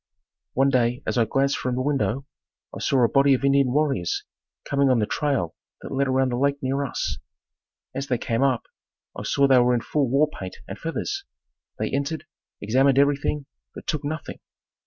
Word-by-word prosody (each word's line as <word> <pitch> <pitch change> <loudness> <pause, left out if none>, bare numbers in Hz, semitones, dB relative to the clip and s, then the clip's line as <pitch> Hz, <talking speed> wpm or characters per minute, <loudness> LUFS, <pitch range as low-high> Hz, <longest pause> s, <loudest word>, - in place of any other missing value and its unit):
One 135 +1 +3
day 125 +1 +1
as 125 - 0
I 115 - +4
glanced 135 +3 +1
from 125 -1 -2
the 130 - -1
window, 135 -2 0 0.5
I - - -6
saw 130 -3 +2
a - - +6
body 140 +2 +4
of 135 - -2
Indian 140 -2 +4
warriors 135 - 0 0.4
coming 140 -1 +2
on 130 - +4
the 110 - +2
trail 135 - -1 0.3
that - - -7
led 140 0 +1
around 130 0 +2
the 120 - -1
lake 140 +2 +2
near 135 +1 -1
us. 135 - -3 0.7
As 135 +1 -4
they 125 - +1
came 115 0 -1
up, 135 -3 +2 0.5
I - - -5
saw 140 - +2
they 130 -2 +6
were 125 0 +4
in 120 - 0
full 140 +1 0
war 140 +4 +4
paint 95 -11 -8
and - - -7
feathers. 390 - -3 0.5
They - - -2
entered, 140 +3 -2 0.4
examined 130 +6 +3
everything, 140 +1 +2 0.3
but - - -9
took 150 -3 -2
nothing. 155 +2 -5
135 Hz, 190 wpm, -24 LUFS, 125-140 Hz, 0.7 s, a